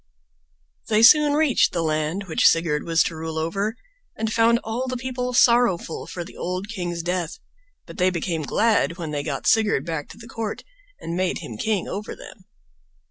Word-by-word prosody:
They 215 +1 +3
soon 295 +4 +7
reached 300 -3 +3
the 170 -2 -1
land 155 +4 -1
which 175 -5 +3
Sigurd 165 -3 +2
was 165 -1 +3
to 165 - -4
rule 160 0 -5
over, 195 +8 -2 0.4
and 220 0 -2
found 230 +1 +4
all 240 +4 -3
the 255 0 -3
people 250 0 -3
sorrowful 235 -9 +2
for 175 - -5
the - - -13
old 185 +3 -4
king's 175 -5 -4
death, 175 -2 -2 0.5
but - - -11
they 180 +1 +4
became 170 -2 -2
glad 195 +2 +1
when 165 -4 -5
they 145 -1 -2
got 145 -2 -4
Sigurd 215 -10 +3
back 160 -3 -4
to - - -12
the 230 0 -12
court, 225 -2 -5 0.4
and 170 - -5
made 185 0 0
him 115 - -8
king 205 - -1
over 205 +2 -5
them. 185 - -13
185 Hz, 185 wpm, -23 LUFS, 165-225 Hz, 0.5 s, soon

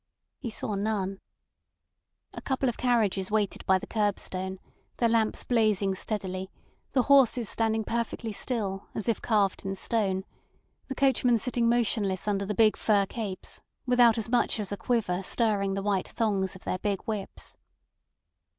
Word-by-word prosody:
He 240 - -4
saw 215 - -3
none. 195 -1 -1 1.1
A - - -7
couple 265 0 -1
of 240 - 0
carriages 215 -6 +1
waited 210 -2 0
by 190 - +5
the - - -7
curbstone, 190 -3 -2 0.4
their 235 - +3
lamps 225 -1 +1
blazing 215 -5 +2
steadily, 190 -2 -3 0.4
the 255 - +3
horses 255 -5 +4
standing 225 -1 +1
perfectly 230 0 -3
still, 200 -3 -2
as 215 - -3
if 230 - 0
carved 205 -4 +1
in 195 0 -3
stone, 195 -2 0 0.6
the 265 - -5
coachmen 255 -3 +3
sitting 235 0 +1
motionless 210 -5 +1
under 200 -1 0
the 210 - -2
big 215 0 +4
fur 205 -2 +3
capes, 195 -3 -6 0.2
without 245 -2 +5
as 225 - 0
much 245 -2 +2
as 205 -2 -3
a - - -1
quiver 205 -5 0
stirring 200 -1 +1
the 195 - -3
white 195 -2 0
thongs 200 -4 -1
of 190 - -13
their 185 - -2
big 200 -2 -1
whips. 210 -3 -5
215 Hz, 155 wpm, -28 LUFS, 195-230 Hz, 1.1 s, by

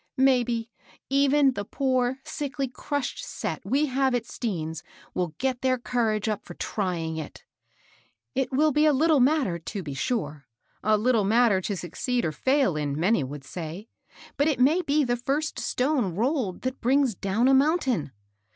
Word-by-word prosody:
" - - -60
Maybe, 245 -3 +2 0.4
even 280 0 +4
the 205 - -3
poor, 255 +2 0
ackly, 275 -3 -4
crushed 285 -2 -3
set - - -4
we 285 +3 +1
have 265 -2 +1
at 235 -2 -1
Stean's 160 -10 -4 0.3
will 175 -4 -2
get 260 -1 -1
their 255 -1 +2
courage 230 -3 -1
up 210 -2 -2
to - - -10
trying 170 -6 -2
for 160 - -2
it. - - -16 0.9
It 265 0 -1
will 300 +4 +3
be 300 +2 +3
a 300 - +5
little 310 +2 +4
matter, 260 - +2
to 195 +4 -6
be 145 -3 -5
sure, 150 - -3 0.2
— - - -40
a 215 +1 +4
little 230 0 +2
matter 220 -1 +3
to 200 +1 -3
suc 175 -1 -7
ceed 250 +4 -1
or 160 - 0
fail 260 - +1
in, 145 -1 -2
many 180 -1 +2
would 140 +1 -7
say; 170 - -7 0.5
but 285 - +3
it 300 -5 +1
may 300 +8 +4
be 300 -2 +2
the 245 -2 0
first 285 +5 -2
stone 250 - 0
rolled 235 - -1
that 260 +1 -3
brings 265 0 +3
down 200 +6 0
a 270 - +5
mountain. 265 - +2
245 Hz, 180 wpm, -26 LUFS, 190-270 Hz, 0.9 s, a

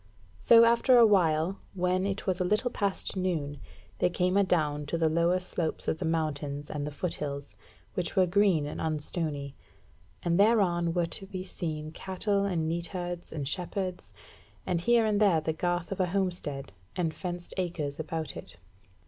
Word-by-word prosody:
So 230 0 +7
after 235 +2 +5
a 235 - +8
while, 180 -3 +3 0.2
when 185 +1 +1
it 195 0 -3
was 185 -1 0
a - - +2
little 210 +7 +1
past 200 -3 -1
noon, 160 -7 -2 0.4
they - - +3
came 180 +1 0
adown 155 -7 +1
to 165 - -1
the 165 -1 +2
lower 170 +3 +2
slopes 175 -3 -3
of 160 - 0
the 185 - -2
mountains 150 -3 -2
and 145 -1 -3
the - - -4
foot 165 +4 -3
hills, 140 -1 -5 0.4
which 175 -2 -2
were 185 - +5
green 180 -4 +3
and 145 - -5
unstony; 150 -2 -1 0.7
and 170 +1 +1
thereon 185 -6 +3
were 175 -1 +2
to 195 +3 -6
be 185 -1 -5
seen 155 -4 -4
cattle 200 +3 -1
and 170 -5 0
neatherds 175 +1 -4
and 145 -4 -3
shepherds, 180 +3 -3 0.5
and 175 -2 0
here 235 +3 +4
and 210 -2 +2
there 190 -6 +5
the 155 +1 -2
garth 175 +2 -1
of 195 - -3
a 185 - +2
homestead, 175 - -2 0.2
and 165 -3 0
fenced 175 0 -6
acres 165 -6 -2
about 160 -2 -4
it. 85 -1 -9
175 Hz, 175 wpm, -29 LUFS, 155-190 Hz, 0.7 s, a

